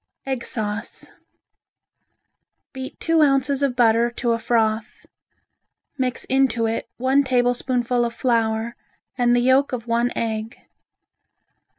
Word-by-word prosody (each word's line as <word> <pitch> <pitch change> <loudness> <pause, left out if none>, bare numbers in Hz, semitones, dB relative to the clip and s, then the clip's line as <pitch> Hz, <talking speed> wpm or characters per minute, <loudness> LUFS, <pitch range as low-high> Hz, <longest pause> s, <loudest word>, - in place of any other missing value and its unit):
Egg 265 -3 -3
Sauce 210 -1 -5 1.6
Beat 265 -1 -8
two 330 -1 +2
ounces 275 -1 +2
of 275 -3 +1
butter 235 -1 +3
to 235 0 -2
a 230 - 0
froth. 220 -2 -1 0.9
Mix 255 -3 -2
into 260 -4 +1
it 225 +1 -3
one 265 +3 +2
tablespoonful 245 -1 +1
of 235 - -1
flour 230 -1 0 0.4
and 245 -1 +3
the 245 - +3
yolk 260 +2 +3
of 235 -2 -4
one 235 +1 +1
egg. 220 0 -3
245 Hz, 115 wpm, -22 LUFS, 230-260 Hz, 1.6 s, butter